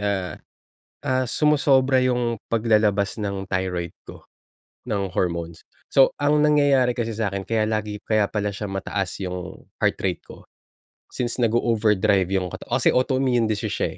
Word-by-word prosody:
ah, 100 -3 -1 0.8
ah 130 0 +2
sumosobra 135 -2 +3
yung 120 -2 0 0.2
paglalabas 105 -3 +2
ng 100 -3 -4
thyroid 90 -2 -2
ko, - - -13 0.6
ng 100 -5 -2
hormones. 85 -2 -2 0.2
So 135 -1 +5
ang 150 +1 +3
nangyayari 140 -4 +3
kasi 115 -3 -3
sa'kin 100 -3 -1
kaya 110 +2 0
lagi 105 -1 -2
kaya 110 -2 +2
pala 105 -1 -2
siya 100 +1 -5
mataas 95 -1 -3
yung, 90 0 -7 0.2
heart - - +2
rate 90 -3 -2
ko. - - -14 0.7
Since 120 -2 -2
nago-overdrive 105 -4 +2
yung 95 -2 0
kata - - -8
osi - - +2
autoimmune 130 -2 +2
disease, 105 -1 -2
siya - - 0
110 Hz, 140 wpm, -23 LUFS, 95-125 Hz, 0.8 s, So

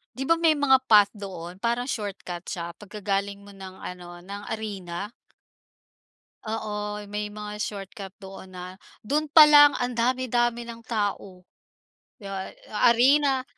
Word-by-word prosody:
Di 265 - -3
ba, 330 +5 +3
may 325 -2 +4
mga 275 -2 +4
path 205 -2 +6
doon 185 -4 -8
parang 235 +3 -1
shortcut 195 -6 -5
siya 170 -1 -4
pagka 210 0 -10
galing 200 0 -1
mo 200 - -13
ng 190 -1 -10
ano 175 -1 -9
ng 200 +2 -8
arena? 200 -2 -6 1.3
Oo, 210 -1 -4
may 210 0 -4
mga 210 0 -7
shortcut 195 -2 -6
doon 190 -1 -11
na, 180 +1 -8 0.2
doon 295 +8 0
pa 305 0 +8
lang 290 -1 +8
ang 245 0 -2
dami, 255 +2 +1
dami 240 0 +1
ng 230 0 -9
tao. 205 -5 -3 0.8
'Di 205 - -11
ba, 195 -1 -5 0.2
a 215 +3 +4
arena 265 +2 +4
210 Hz, 150 wpm, -25 LUFS, 195-240 Hz, 1.3 s, pa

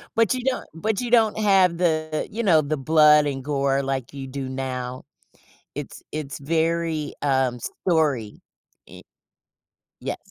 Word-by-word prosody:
But 225 -1 +3
you 255 - -3
don't 265 0 -1
but 210 +6 -2
you 240 -1 -4
don't 225 -3 +4
have 190 -5 +4
the, 155 -3 0
you 230 +3 -3
know, 165 -7 +5
the 155 +1 -2
blood 150 +1 +5
and 135 -2 -4
gore 140 -1 0
like 135 -2 -3
you 135 -1 -7
do 135 0 -5
now. 130 -1 -4 0.7
It's - - -7
it's 150 -3 -5
very, 160 0 -1
um, 130 -3 +1
story. 145 - -1 0.5
Y - - -13 1.0
Yes. - - -3
155 Hz, 145 wpm, -23 LUFS, 135-170 Hz, 1.0 s, know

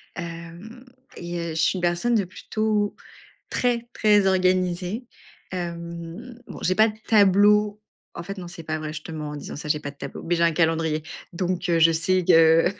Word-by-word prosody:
Hem, 170 +8 -8 0.3
et 175 0 -5
heu, 170 0 -3
je 160 - -6
suis 185 - +2
une - - -4
personne 175 +8 +1
de 200 - +2
plutôt 210 +3 -1 0.6
très, 240 -1 0
très 210 -2 +3
organisée. 185 +3 +1 0.5
Hem, 170 +5 -6
bon, - - -9
j'ai 185 - +2
pas 220 +3 +5
de 215 - -6
tableau 210 0 +4 0.4
en - - -5
fait, 195 +3 -7
non, 180 - -7
c'est 175 -1 -9
pas 155 0 -3
vrai, 155 0 -5
je 155 0 -7
te - - -9
ments 150 -1 -5
en 150 - -6
disant - - -7
ça. 150 - -7
J'ai 150 0 +1
pas 145 - -5
de 140 - -19
tableau, - - -7
mais 175 +1 0
j'ai 170 - +2
un 165 - +3
calendrier, 160 -1 +1 0.3
donc 180 0 -2
je 165 -1 +5
sais 180 +3 +1
que 165 0 +6
175 Hz, 195 wpm, -24 LUFS, 165-205 Hz, 0.6 s, que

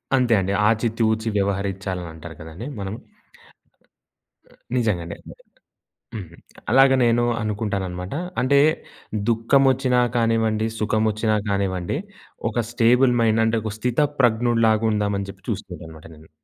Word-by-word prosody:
అంతే 125 -3 +3
అండి. 95 +1 -1
ఆచి, 115 +1 +2
తూచి 110 0 +1
వ్యవహరించాలని 95 -2 -2
అంటారు 80 0 -10
కదండీ. 80 - -8
మనము. 100 +2 -4 1.8
నిజంగా 110 -8 +1
అండి. 85 - -7 1.0
హ్మ్. 90 -6 -7 0.4
అలాగ 135 +2 +6
నేను 120 0 +3 0.2
అనుకుంటానన్నమాట. 100 -4 -3 0.3
అంటే, 140 +2 +4 0.7
దుఃఖం 115 +4 +3
ఒచ్చినా 130 -1 +1
కానివ్వండి, 115 -2 +1
సుఖమొచ్చినా 110 0 +1
కానివ్వండి, 95 +1 -1 0.5
ఒక 120 +1 -1
స్టేబుల్ 125 +2 +4
మైండ్ 110 0 +3
అంటే, 115 +1 +1
ఒక 110 -2 -4
"స్థితప్రజ్ఞుడు" 120 -2 +1
లాగా 110 0 +2
ఉందామని 100 -2 -1
చెప్పి 95 -1 -22
చూసుకుంటాన్నమాట 80 -1 -7
నేను. 80 +1 -18
110 Hz, 115 wpm, -22 LUFS, 100-120 Hz, 1.8 s, అలాగ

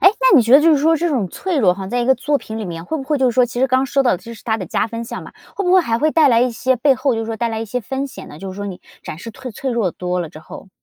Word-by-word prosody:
诶， 375 - +8
那 - - +6
你 250 - +6
觉 230 +2 0
得 280 - +9
就 330 +1 +5
是 300 - +4
说 320 +3 +3
这 340 +2 0
种 240 - -1
脆 355 - -3
弱 185 -7 +4
哈， 190 0 -7
在 245 +5 -1
一 240 - -1
个 265 - +5
作 285 +3 0
品 220 -2 -7
里 220 - -4
面 170 -2 -6
会 320 - -3
不 275 - -5
会 295 +3 -1
就 260 -2 +3
是 - - -8
说 255 - +5
其 240 +1 -7
实 265 - +4
刚 260 +1 +2
说 275 +2 +1
到 245 - +3
的 - - +1
这 230 +6 -10
是 215 - -15
它 220 -2 0
的 190 -5 -6
加 - - 0
分 230 +1 -6
项 - - -7
嘛， - - -12 0.2
会 400 - -2
不 360 - +2
会 375 - +7
还 230 -8 -1
会 310 +3 +2
带 310 -2 +4
来 235 -2 +4
一 250 +1 +2
些 255 +3 0
背 275 +3 +3
后 260 0 0
就 225 - -2
是 225 - -4
说 225 0 -4
带 235 0 -1
来 220 0 -3
一 - - -3
些 250 +3 -3
风 265 +5 -4
险 270 - -11
呢， 150 - -11
就 195 +3 -7
是 - - -11
说 205 0 -5
你 185 -2 -7 0.2
展 155 - -7
示 230 +6 -8
退 260 +2 -9
脆 260 +4 -4
弱 230 -6 0
多 180 +1 -3
了 170 - -4
之 155 - -12
后？ 160 - -12
240 Hz, 410 characters per minute, -19 LUFS, 220-275 Hz, 0.2 s, 得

